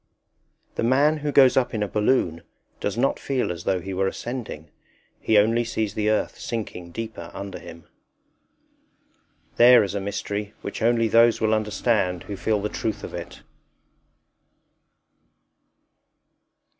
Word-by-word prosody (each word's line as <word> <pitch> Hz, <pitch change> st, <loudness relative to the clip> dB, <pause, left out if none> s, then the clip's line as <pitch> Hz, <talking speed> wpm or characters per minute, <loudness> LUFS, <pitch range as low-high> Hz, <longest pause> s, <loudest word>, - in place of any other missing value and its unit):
The -, -, 0 dB
man 140 Hz, +6 st, +3 dB
who 150 Hz, 0 st, -2 dB
goes 135 Hz, -3 st, +6 dB
up 130 Hz, -3 st, +1 dB
in 105 Hz, -, 0 dB
a -, -, -2 dB
balloon 105 Hz, -6 st, +1 dB, 0.4 s
does 100 Hz, +2 st, -3 dB
not 135 Hz, +3 st, +1 dB
feel 130 Hz, -8 st, -1 dB
as 85 Hz, -1 st, -7 dB
though 95 Hz, -1 st, +1 dB
he 95 Hz, +2 st, -6 dB
were 95 Hz, +1 st, 0 dB
ascending; 115 Hz, -9 st, -6 dB, 0.5 s
he 110 Hz, -, +2 dB
only 115 Hz, +3 st, +3 dB
sees 110 Hz, -3 st, -2 dB
the 105 Hz, 0 st, 0 dB
earth 110 Hz, -, -1 dB
sinking 100 Hz, -6 st, -5 dB
deeper 110 Hz, -4 st, -6 dB
under 100 Hz, 0 st, -6 dB
him. 85 Hz, -1 st, -12 dB, 1.7 s
There 120 Hz, -1 st, +8 dB
is 100 Hz, -, -3 dB
a 100 Hz, -, -1 dB
mystery 100 Hz, +1 st, -4 dB
which 100 Hz, -, -5 dB
only 115 Hz, 0 st, +3 dB
those 115 Hz, +1 st, +4 dB
will 110 Hz, 0 st, +2 dB
understand 105 Hz, -4 st, 0 dB
who 100 Hz, -, -6 dB
feel 105 Hz, +2 st, 0 dB
the -, -, +1 dB
truth 110 Hz, 0 st, -4 dB
of -, -, -7 dB
it. -, -, -8 dB
110 Hz, 145 wpm, -24 LUFS, 100-120 Hz, 1.7 s, There